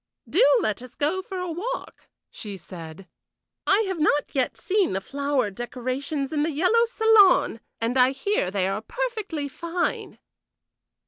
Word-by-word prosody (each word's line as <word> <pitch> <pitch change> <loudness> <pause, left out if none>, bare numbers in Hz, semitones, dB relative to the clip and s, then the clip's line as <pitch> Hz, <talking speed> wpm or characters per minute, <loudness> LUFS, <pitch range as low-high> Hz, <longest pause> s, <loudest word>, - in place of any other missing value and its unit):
"Do 345 - +3 0.2
let 215 +1 -1
us 250 -1 -12
go 315 +6 0
for 380 0 -7
a 360 -1 -3
walk," 445 +10 -5 0.2
she 205 -2 -7
said. 170 0 -10 0.6
"I 420 - +5
have 380 -5 -2
not 295 -1 +1
yet 260 -3 0
seen 395 - +1
the 190 - 0
flower 275 0 -1
decorations 255 +6 -3
in 295 - +1
the 310 - +1
yellow 365 +10 +3
salon, 445 - +4 0.2
and 230 +2 -1
I 250 0 +6
hear 270 - -1
they 190 -1 0
are 195 +2 -2
particularly 435 - -3
fine." 340 +4 -3
290 Hz, 150 wpm, -25 LUFS, 240-375 Hz, 0.6 s, I